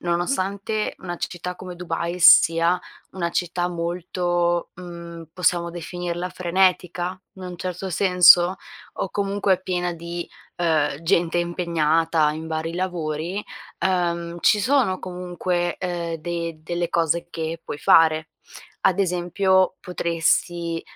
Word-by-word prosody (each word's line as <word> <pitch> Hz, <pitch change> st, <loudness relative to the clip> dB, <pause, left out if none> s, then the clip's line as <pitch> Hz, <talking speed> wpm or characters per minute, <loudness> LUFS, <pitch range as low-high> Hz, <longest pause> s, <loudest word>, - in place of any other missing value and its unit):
nonostante 195 Hz, +4 st, -1 dB
una 175 Hz, -2 st, -6 dB
c -, -, -2 dB
città 180 Hz, +1 st, -6 dB
come 180 Hz, -1 st, -8 dB
Dubai 170 Hz, 0 st, -3 dB
sia 170 Hz, 0 st, +6 dB, 0.3 s
una 170 Hz, -2 st, -2 dB
città 175 Hz, 0 st, -1 dB
molto, 175 Hz, 0 st, -1 dB
mhmm, 170 Hz, -2 st, -9 dB
possiamo 175 Hz, -1 st, +1 dB
definirla 175 Hz, +1 st, -4 dB
frenetica? 180 Hz, 0 st, 0 dB
In 190 Hz, -, -12 dB
un 180 Hz, -1 st, -7 dB
certo 185 Hz, +1 st, -5 dB
senso, 180 Hz, 0 st, +6 dB, 0.4 s
o 195 Hz, -, -3 dB
comunque 200 Hz, -2 st, 0 dB
piena 180 Hz, -1 st, -1 dB
di, 170 Hz, +1 st, -6 dB, 0.3 s
uhm, 155 Hz, -4 st, +1 dB
gente 170 Hz, -1 st, +2 dB
impegnata 165 Hz, -2 st, +1 dB
in 160 Hz, +1 st, -6 dB
vari 160 Hz, +1 st, -3 dB
lavori, 175 Hz, +1 st, -3 dB, 0.4 s
uhm, 170 Hz, -2 st, 0 dB
ci 210 Hz, -, +4 dB
sono 235 Hz, -5 st, +2 dB
comunque, 180 Hz, -1 st, -3 dB
uhm, 175 Hz, -2 st, -3 dB
de 170 Hz, 0 st, -4 dB
delle 175 Hz, +1 st, -2 dB
cose 170 Hz, 0 st, 0 dB
che 165 Hz, 0 st, -4 dB
puoi 145 Hz, -, -6 dB
fare. 160 Hz, -1 st, +4 dB, 0.5 s
Ad 190 Hz, +1 st, +3 dB
esempio 185 Hz, +1 st, +2 dB
potresti, 170 Hz, -1 st, -1 dB
175 Hz, 120 wpm, -23 LUFS, 170-180 Hz, 0.5 s, sia